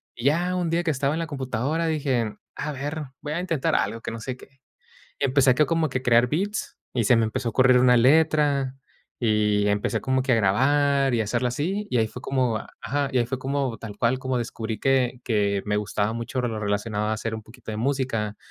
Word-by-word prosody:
Y 120 - -7
ya 170 +6 +2
un 175 -2 -1
día 170 +2 +1
que 165 - +1
estaba 140 0 0
en 160 - -2
la 165 - -2
computadora, 140 +3 -2
dije: 135 -8 0 0.2
"A 150 - -3
ver, 145 +3 -4 0.2
voy 150 - -4
a 170 - -1
intentar 165 -6 -1
algo", 105 +4 -1
que - - -5
no 115 - -6
sé 125 +3 -5
qué. 135 +1 -18 0.6
Empecé 135 -1 +3
acá 150 +5 +3
como 165 -1 +1
que 130 0 -3
crear 120 -1 +4
beats 200 +8 -2 0.2
y 120 -3 +1
se 125 - +5
me 115 - +3
empezó 115 +2 -2
a - - -6
ocurrir 130 0 +5
una 125 0 +5
letra 140 0 +3 0.4
y 105 -3 +2
empecé 105 +2 0
como 130 0 +1
que 130 0 +1
a - - +5
grabar 135 +6 +3
y 115 - +2
hacerla 120 +4 0
así, 180 +12 -2
y 125 - +1
ahí 110 -1 +2
fue 125 - -10
como 125 -4 0 0.2
ajá, 140 0 -1
y 130 - +2
ahí 120 - +2
fue 125 +2 -4
como 135 -2 -2
tal 105 -1 -8
cual 120 +3 +1
como 130 -1 -1
descubrí 115 -2 -4
que 130 -2 +1
que 100 -3 +1
me 105 0 0
gustaba 105 0 -1
mucho 115 +3 -3
lo 115 -3 -2
relacionado 105 +1 -1
a 110 - 0
hacer 110 +1 -4
un 110 - -5
poquito 110 +1 -10
de 105 - -4
música, 115 -4 -1
125 Hz, 225 wpm, -25 LUFS, 110-140 Hz, 0.6 s, se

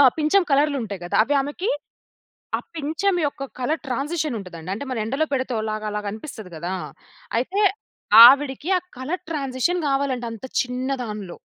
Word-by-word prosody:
ఆ! - - +9 0.2
పించం 315 +5 +3
కలర్‌‌లుంటాయి 275 - +1
గదా! 175 - -1
అవి 285 +4 +1
ఆమెకి, 295 +9 -3 0.9
ఆ - - -6 0.2
పించం 320 +7 0
యొక్క 280 - -5 0.2
కలర్ 300 +6 -1
ట్రాన్సిషనుంటదండి. 245 - -3
అంటే, 220 - -5
మనం 230 -4 -1
ఎండలో 275 +7 0
పెడితే 260 -2 -1
ఓలాగ 215 0 -3
అలాగనిపిస్తది 210 - -6
గదా! 175 +4 -3 0.6
అయితే 365 - -1 0.7
ఆవిడికి 280 +4 +4
ఆ - - -7 0.2
కలర్ 310 +9 -3
ట్రాన్సిషన్ 290 +3 -1
గావాలంట. 270 -3 0
అంత 225 +3 -8 0.2
చిన్న 255 +1 -4
దానిలో. 210 -5 -6
265 Hz, 140 wpm, -23 LUFS, 220-300 Hz, 0.9 s, ఆ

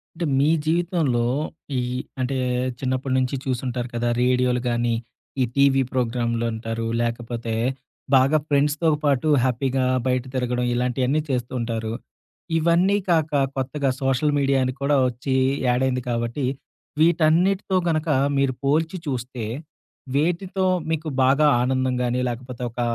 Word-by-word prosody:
అంటే 170 - -2
మీ 145 +2 +3 0.2
జీవితంలో, 160 -7 +1 0.5
ఈ - - +2 0.4
అంటే 130 +2 -1 0.4
చిన్నప్పడి 130 0 -1
నుంచి 130 +1 0
చూసుంటారు 125 -1 -2
కదా! 120 0 0
రేడియోలు 125 0 +2
గానీ, 120 0 +1 0.5
ఈ - - +5
టీవీ 140 -1 +4
ప్రోగ్రాములంటారు, 115 -2 -1 0.2
లేకపోతే, 115 -1 -3 0.6
బాగా 135 +4 +5
ఫ్రెండ్స్‌తో 150 +3 +2
పాటు 140 +1 +2 0.2
హ్యాపీగా 130 +1 0 0.2
బయట 130 0 +1
తిరగడం 125 -1 -1
ఇలాంటియన్నీ 125 +4 0
చేస్తూ 125 -3 -2
ఉంటారు. 115 -1 -3 0.6
ఇవన్నీ 170 +5 +3
కాక 160 -3 +2 0.3
కొత్తగా 135 +1 -1
సోషల్ 135 +3 +1
మీడియాని 135 -2 +1
కూడా 140 +1 +2
వచ్చి 125 +2 -2 0.3
యాడైంది 125 0 +1
కాబట్టి, 120 +3 -1 0.6
వీటన్నిటితో 175 +4 +3
గనక 155 0 0 0.3
మీరు 135 -2 +1
పోల్చి 160 +5 +1
చూస్తే, 125 -3 -4 0.7
వేటితో 180 +5 0 0.3
మీకు 160 0 -2 0.2
బాగా 140 +4 +4 0.2
ఆనందం 130 0 0
గాని, 125 +1 0
లేకపోతే 125 +1 -6
ఒక 120 - -4
130 Hz, 120 wpm, -23 LUFS, 125-150 Hz, 0.7 s, ఈ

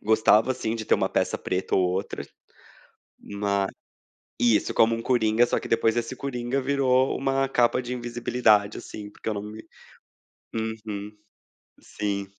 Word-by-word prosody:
gostava 110 +3 +4
sim 115 -3 -2
de 110 -1 -5
ter - - +4
uma - - 0
peça - - 0
preta 90 +1 -2
ou 95 - +3
outra. 95 +2 -4 0.9
Ma 100 -1 -1 0.7
Isso, 115 -3 +2
como 115 +1 +4
uma 115 - -4
coringa. 115 -1 +3
Só - - 0
que - - -7
depois 115 0 +2
esse 120 +2 -2
coringa 125 0 -2
virou 130 -1 +2
uma 135 0 0
capa 125 -1 +2
de 125 0 -5
invisibilidade 120 -3 +1
assim, 105 -1 -9
porque 110 - -8
eu - - -2
não 100 - -4
me 110 +1 -9 0.9
Uhum. 110 -2 -4 0.7
Sim. 100 -1 -3
115 Hz, 150 wpm, -25 LUFS, 105-125 Hz, 0.9 s, gostava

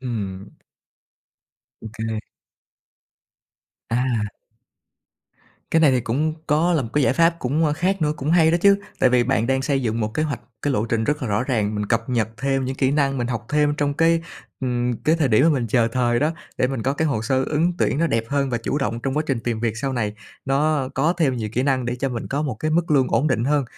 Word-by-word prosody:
Ừm. 100 -6 -5 1.3
OK. 110 0 -5 1.7
À. 115 -4 0 1.4
Cái 165 - +3
này 150 -4 +6
thì 130 - +2
cũng 150 +8 -1
có 160 +4 +2
là 155 -5 +2
một 115 - -6
cái 145 -2 +2
giải - - +3
pháp 170 0 +3
cũng, 145 +5 0
ơ, 150 - +2
khác 185 +3 0
nữa, 150 0 +2
cũng 145 +3 -2
hay 165 -2 +5
đó 170 - +3
chứ, 200 +1 +5 0.2
tại 130 - +5
vì 125 -1 +3
bạn 110 +2 +1
đang 135 0 +1
xây 135 -1 0
dựng 115 0 -1
một 110 0 -2
kế 155 - 0
hoạch, 150 -3 -2 0.2
cái 145 - 0
lộ 110 -3 0
trình 110 -1 0
rất 150 +1 -1
là 120 - -2
rõ 105 +4 +1
ràng, 110 -5 -1
mình 105 0 -2
cập 115 +1 0
nhật 115 -4 0
thêm 135 -1 0
những 130 +1 -3
kỹ 135 -1 +2
năng, 140 -2 +1
mình 120 - -1
học 120 -2 -4
thêm 150 -1 +2
trong 145 -1 0
cái, 165 +1 +3 0.4
ừm, 125 -1 0
cái 160 +2 +3
thời 145 -5 +1
điểm 110 +3 +4
mà 165 - +5
mình 130 -6 0
chờ 115 0 +2
thời 120 -2 +1
đó, 150 +2 +2 0.3
để 125 - +3
mình 130 -4 -3
có 135 - +1
cái 160 +2 0
hồ 110 -5 -1
sơ 130 +2 +1
ứng 165 +4 +1
tuyển 140 - +1
nó 170 - +2
đẹp 115 -5 0
hơn 140 -1 0
và 120 - 0
chủ 140 +5 -2
động 115 -3 -2
trong 135 +3 -2
quá 155 - +2
trình 130 -5 -1
tìm 115 -1 -2
việc 115 -2 -1
sau 135 +3 -2
này, 105 -4 -1 0.3
nó 140 0 +1
có 155 +6 +2
thêm 140 -7 +1
nhiều 110 -2 -3
kỹ 125 +2 0
năng 135 -2 +1
để 125 0 -2
cho 135 +2 -1
mình 120 -2 -5
có 145 +2 -1
một 140 -6 -2
cái 155 +8 -3
mức 170 0 +1
lương 135 -3 +3
ổn 145 - +1
định 120 -3 0
hơn. 145 0 +2
130 Hz, 240 wpm, -22 LUFS, 115-150 Hz, 1.7 s, này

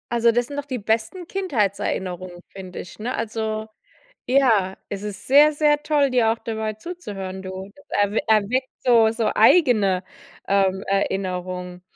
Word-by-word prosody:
Also, 235 0 +3
das 240 +1 +1
sind 285 - -7
doch 285 - -3
die 260 -3 -4
besten 220 - -2
Kindheitserinnerungen, 195 - -2
finde 185 -2 -9
ich, 180 - -10
ne? 240 +4 -3
Also 220 -1 -3 0.6
ja. 230 -8 +3
Es 200 -1 -5
ist 205 -2 -7
sehr, 295 +3 +6
sehr 295 0 +2
toll, 295 -2 +2
dir 235 -3 +3
auch 225 - -2
dabei 220 -1 -4
zuzuhören, 205 - -7
du. 190 +1 -7 0.2
Erw 205 +1 +1
Erweckt 220 +5 +2 0.2
so 230 -3 +5
so 225 -1 -1
eigene, 215 - +4 0.4
ähm, 195 -1 +2
Erinnerungen. 185 -2 -2
220 Hz, 145 wpm, -22 LUFS, 195-255 Hz, 0.6 s, sehr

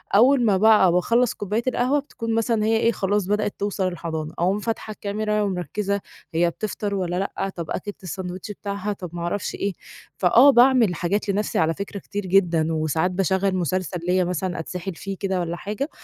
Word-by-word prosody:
أوّل 250 +3 +5
ما 200 -3 +4
بقى 210 -3 +6
باخلّص 230 +7 +2
كوباية 210 +3 -2
القهوة 255 +3 +2
بتكون 230 -5 -5
مثلًا 225 -1 +1
هي 225 +1 +3
إيه 230 +1 +3
خلاص 205 -2 0
بدأت 210 0 0
توصل 200 -2 -1
الحضانة، 160 -3 -4
أقوم 185 +4 +2
فاتحة 225 0 -3
الكاميرا 210 +1 -2
ومركّزة، 200 +1 -2 0.3
هي 170 +1 +3
بتفطر 205 +2 -3
والّا 180 -2 -2
لأ، 195 0 -2
طَب 170 -3 -5
أكلِت 205 -2 -5
السندوتش 185 +2 -5
بتاعها، 200 0 -4
طَب 180 -3 -8
ما 175 - -5
أعرفش 175 +4 -2
إيه، 200 -1 -2 0.4
فآه 235 +9 +6
باعمل 245 -6 +5
حاجات 200 +5 -1
لنَفْسي 200 +1 0
على 160 0 +2
فكرة 200 +3 -6
كتير 205 +2 -5
جدًا، 170 -4 +2
وساعات 160 +3 0
باشغّل 190 +1 +1
مسلسل 185 0 -1
ليّا 185 +1 +3
مثلًا 180 0 -2
أتسحل 180 +2 -5
فيه 195 +3 -6
كده 190 -1 -1
والّا 170 0 -3
حاجة، 210 - -4
195 Hz, 180 wpm, -23 LUFS, 180-210 Hz, 0.4 s, بقى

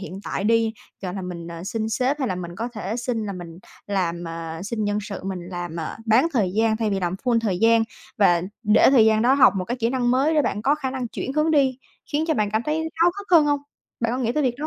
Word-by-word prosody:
hiện 195 0 -7
tại 195 - -3
đi, 225 0 +3 0.3
gọi 180 0 -4
là, 190 - -4
mình, 170 -2 -6
ờ, 170 +1 -7
xin 220 +2 -2
sếp 260 +6 0
hay 265 - -1
là 185 - -1
mình 175 -1 -7
có 230 +3 -3
thể 215 0 -4
xin 235 -3 -2
là 200 - -3
mình 175 -2 -9 0.3
làm, 175 -4 -1
ờ 165 -1 -6
xin 215 +1 -3
nhân 205 0 0
sự, 200 -1 -6
mình 190 -2 -4
làm, 175 -2 -5
à, 155 - -5
bán 230 +8 +4
thời 210 -8 +1
gian 220 +1 +2
thay 220 -2 -1
vì 195 - -1
làm 175 0 -1
full 240 -2 +3
thời 195 -5 -1
gian 225 +1 +5 0.4
và 175 -4 +4 0.2
để 210 +4 +5
thời 240 -5 +6
gian 220 0 +3
đó 260 +3 +4
học 270 -8 +6
một 185 - -1
cái 245 +5 -3
kỹ 230 -1 0
năng 245 -2 +1
mới 280 +5 +2
để 300 - +4
bạn 210 -4 -2
có 285 +4 +3
khả 270 -4 -3
năng 255 -3 -4
chuyển 265 - -4
hướng 305 +2 +2
đi 270 -4 +2 0.3
khiến 305 +2 +1
cho 315 - +3
bạn 210 -3 0
cảm 220 +2 0
thấy 300 +3 -1 0.2
háo 335 +2 +4
hức 405 - -8
hơn 330 -4 +7
hông? 290 -1 +1 0.4
Bạn 230 0 0
có 255 - -1
nghĩ 235 -2 0
tới 300 +3 0
việc 250 -2 +1
đó 305 - -3
220 Hz, 280 wpm, -23 LUFS, 190-260 Hz, 0.4 s, hơn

